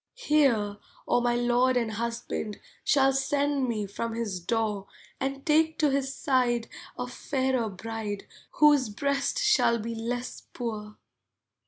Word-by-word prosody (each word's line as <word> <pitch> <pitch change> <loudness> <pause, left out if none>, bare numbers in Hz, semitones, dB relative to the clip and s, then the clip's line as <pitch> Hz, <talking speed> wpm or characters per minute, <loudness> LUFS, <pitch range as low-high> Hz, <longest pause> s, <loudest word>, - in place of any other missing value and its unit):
Hear, 265 - +2 0.3
or 245 - +2
my 240 0 +2
lord 245 +1 +3
and 230 -2 0
husband 230 -1 -3 0.2
Shall 270 -1 +4
send 280 0 +1
me 215 -3 -1
from 225 +3 -4
his 215 -5 -2
door 210 +1 -1 0.3
And 275 0 -3
take 315 +1 +3
to 300 -2 +3
his 270 0 0
side 250 -4 +1 0.3
a 250 - -2
fairer 260 -2 -1
bride 210 +1 -5 0.3
Whose 290 -5 +5
breast 280 - -1
shall 425 - +4
be 230 +1 -4
less 245 +2 -4
poor. 215 -3 -5
245 Hz, 135 wpm, -28 LUFS, 225-275 Hz, 0.3 s, Whose